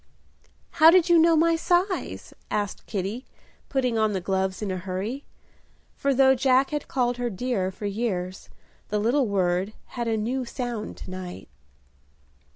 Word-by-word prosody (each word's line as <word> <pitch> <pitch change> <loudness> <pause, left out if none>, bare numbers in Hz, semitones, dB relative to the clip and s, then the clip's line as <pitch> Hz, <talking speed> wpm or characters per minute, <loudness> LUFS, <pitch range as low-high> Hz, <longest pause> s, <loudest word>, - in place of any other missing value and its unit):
"How 320 - +11
did 355 0 +5
you 340 -1 +6
know 330 0 +5
my 330 +1 +4
size?" 360 +3 -1 0.2
asked 205 -1 -3
Kitty, 205 +5 -3 0.5
putting 250 -4 0
on 215 -1 +2
the 190 - -1
gloves 190 +2 -1
in 200 - -2
a 185 - -2
hurry; 190 +9 -4 0.7
for 280 - 0
though 265 0 +5
Jack 265 +1 +3
had 295 -1 -3
called 245 -2 0
her 245 -1 -1
"dear" 210 -2 -1
for 190 +2 -8
years, 195 -3 -3 0.4
the 210 - 0
little 240 +5 +2
word 190 0 0 0.2
had 240 -2 -3
a 225 -1 +1
new 245 +5 -1
sound 240 -3 -5
to - - -9
night. 180 - -8
230 Hz, 160 wpm, -25 LUFS, 190-265 Hz, 0.7 s, How